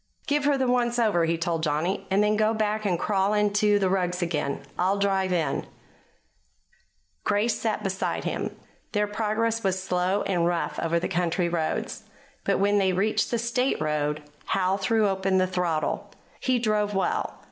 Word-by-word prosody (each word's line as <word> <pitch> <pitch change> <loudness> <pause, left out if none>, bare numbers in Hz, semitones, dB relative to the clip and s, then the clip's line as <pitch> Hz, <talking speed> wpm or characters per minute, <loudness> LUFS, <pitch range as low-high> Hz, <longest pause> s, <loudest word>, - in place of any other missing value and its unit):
"Give 290 0 +1
her 285 -1 +3
the 265 - +1
'once 245 -1 +1
over,'" 210 -8 +3
he 165 +1 0
told 165 0 -1
Johnny, 160 +5 -1
"and 200 +2 +3
then 210 0 +2
go 215 +1 +2
back 215 0 -1
and 180 -3 +1
crawl 200 +2 +1
into 210 0 +3
the 195 -2 +1
rugs 180 -1 0
again. 150 -4 -2
I'll 190 +3 +1
drive 195 -2 +1
in." 160 -6 0 1.6
Grace 210 +3 +1
sat 215 -2 -1
beside 190 -1 -2
him. - - -3 0.4
Their 210 -1 +2
progress 220 +2 -1
was 190 -1 +1
slow 185 +1 0
and 175 -3 +1
rough 175 -1 -1
over 170 +1 +1
the 170 - -2
country 175 -1 0
roads, 165 -2 -2 0.4
but - - +1
when 205 +1 +3
they 190 -1 +2
reached 210 +3 +1
the 235 - 0
State 235 +3 0
road 150 0 -1 0.2
Howe 185 0 +1
threw 210 +2 +2
open 190 -1 +1
the 185 - +4
throttle. 180 -4 -1 0.3
He 255 -1 +1
drove 210 -3 0
well. 190 - -1
195 Hz, 170 wpm, -26 LUFS, 175-215 Hz, 1.6 s, the